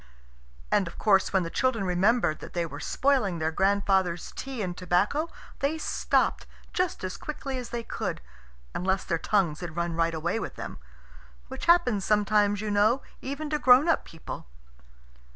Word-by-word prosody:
And, 195 -3 +3
of 165 - -9
course, 195 -3 +3
when 190 -2 +2
the 165 - -5
children 255 -5 +1
remembered 180 -2 +2
that - - -10
they 175 -1 0
were 165 - -7
spoiling 255 -10 +1
their 160 0 0
grandfather's 190 -1 +1
tea 265 -5 -4
and 180 -2 -3
tobacco 190 - +1 0.3
they 285 +3 0
stopped - - 0 0.3
just 365 - -1
as 185 0 -4
quickly 275 -3 -5
as 245 - -7
they 235 -1 -4
could, - - -4 0.5
unless 190 +1 0
their 165 -3 -1
tongues 175 -6 +1
had 170 -3 -6
run 170 0 -1
right 165 0 +1
away 170 +7 -1
with - - -5
them - - -7 0.7
which 265 0 -6
happens 245 - +4
sometimes, 210 0 +2
you 215 -1 -2
know, 210 +6 +3 0.2
even 280 +3 -4
to 300 - +1
grown 255 +4 +6
up 330 - +2
people. 165 - -9
205 Hz, 170 wpm, -27 LUFS, 175-255 Hz, 0.7 s, grown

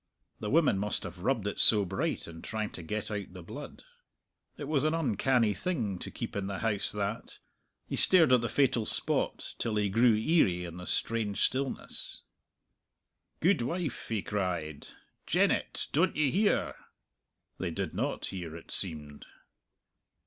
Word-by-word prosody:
The 105 - -4
women 150 -9 +3
must 105 0 -2
have 90 - -8
rubbed 115 +1 0
it 100 - -3
so 105 -3 +6
bright 95 +1 -2
in 80 -1 -10
trying 110 -1 -4
to - - -7
get 105 +6 -4
out 100 -3 -5
the 90 -2 -10
blood. 145 - -9 0.7
It - - -6
was 145 -2 +1
an 155 +1 +1
uncanny 125 -5 +1
thing 105 - -2
to - - -6
keep - - -6
in 100 -1 -2
the 100 -1 -4
house 105 -2 +1
that. 105 +2 -4 0.5
He - - -3
stared 165 -8 +6
at 125 - +5
the 120 - -2
fatal 125 -6 +2
spot - - +3
till 115 -2 -1
he 105 -1 +1
grew 115 +3 +4
eerie 105 - +2
in 85 0 -8
the 90 - -7
strange 110 -3 0
stillness. 135 +1 -2 1.2
"Guidwife!" 170 - 0
he 110 -3 -1
cried, 90 -7 -3 0.4
"Jennet! - - +1
Don't 170 +5 +2
ye 145 -3 +2
hear?" 205 +3 +1 0.9
They - - -2
did - - -4
not - - -2
hear, 85 -4 -6
it 85 - -11
seemed. 75 -6 0
105 Hz, 155 wpm, -30 LUFS, 95-135 Hz, 1.2 s, so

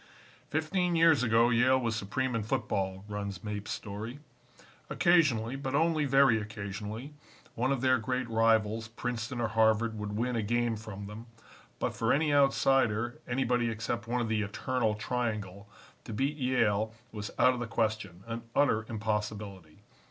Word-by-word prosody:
"Fifteen 175 +3 0
years 165 -5 +5
ago 115 0 +4
Yale 125 +3 +4
was 115 -3 -1
supreme 125 +5 -2
in 115 - 0
football," 95 -2 -2
runs 100 -3 -5
Mapes' 105 -1 -5
story. 105 +5 -5 0.7
"Occasionally, 145 -10 +3
but 135 0 -3
only 160 0 +2
very 135 -5 +4
occasionally, 105 +5 -6 0.4
one 130 +3 0
of 135 -3 0
their 130 -1 +3
great 125 +2 -2
rivals, 110 -1 +2
Princeton 120 +1 -4
or 115 -2 0
Harvard, 110 0 +2
would 105 0 -4
win 125 +2 0
a 115 - +1
game 120 +2 0
from 105 -2 -8
them, 105 +3 -9 0.5
but - - -2
for - - 0
any 150 +1 +2
outsider, 130 -4 +2
anybody 125 -1 +1
except 115 0 -3
one 120 +1 0
of 115 - -1
the 110 -1 0
'Eternal 110 +2 -1
Triangle,' 105 -4 -3 0.4
to 115 - -6
beat 135 +7 0
Yale 115 -5 +1 0.2
was 105 -2 -5
out 125 - +5
of 125 - -5
the 120 - -3
question 110 -5 -2
an 115 0 -5
utter 110 -7 +2
impossibility. 105 -6 -4
115 Hz, 155 wpm, -30 LUFS, 105-130 Hz, 0.7 s, years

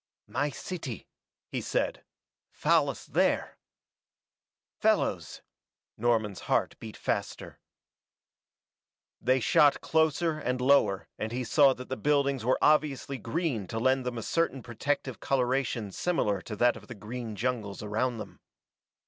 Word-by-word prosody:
"My 145 +1 -1
city," 140 - -6 0.5
he - - -2
said. - - -1 0.5
"Fallas - - +1
there." - - 0 1.2
Fellows! - - 0 0.5
Norman's 110 -4 0
heart - - +2
beat - - -9
faster. - - -3 1.6
They 130 +2 +3
shot 145 +4 +4
closer 160 0 +1
and 125 -3 -1
lower 125 -7 +3
and 110 +1 -3
he 125 +2 -2
saw 135 +3 +5
that 125 - -9
the 130 - -3
buildings 140 0 +1
were 125 +3 +2
obviously 145 -3 +2
green 125 - -2
to 110 - -5
lend 130 +3 +2
them 125 -1 -3
a 115 - -4
certain 165 -4 0
protective 130 +2 -2
coloration 125 -5 0
similar 105 - 0
to 105 - -6
that 120 +3 +3
of - - -12
the 120 - -8
green 110 +2 -6
jungles 110 -4 -2
around 115 +4 -1
them. 110 - -9
125 Hz, 130 wpm, -29 LUFS, 115-140 Hz, 1.6 s, saw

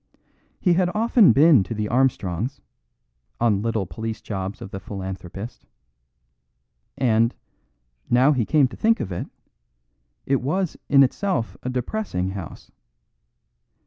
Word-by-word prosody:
He 180 - +3
had 180 0 +2
often 225 -1 +5
been 145 -4 +6
to 95 +5 -4
the 105 0 -2
Armstrongs', 120 -1 0 0.8
on 105 -4 +2
little 110 -3 -1
police 110 +7 -5
jobs 95 -1 -5
of 95 - -9
the 95 - -5
philanthropist; 95 +3 -7 1.3
and, 115 -2 +2 0.7
now 130 +4 +5
he 130 -5 +1
came 145 +3 +3
to - - -10
think 225 +1 +2
of 95 - -4
it, 85 - -4 1.0
it 135 -1 +1
was 175 +7 -1
in 140 -1 +7
itself 135 - -1
a 125 - -4
depressing 125 - -2
house. 95 -4 -8
120 Hz, 125 wpm, -23 LUFS, 100-145 Hz, 1.3 s, in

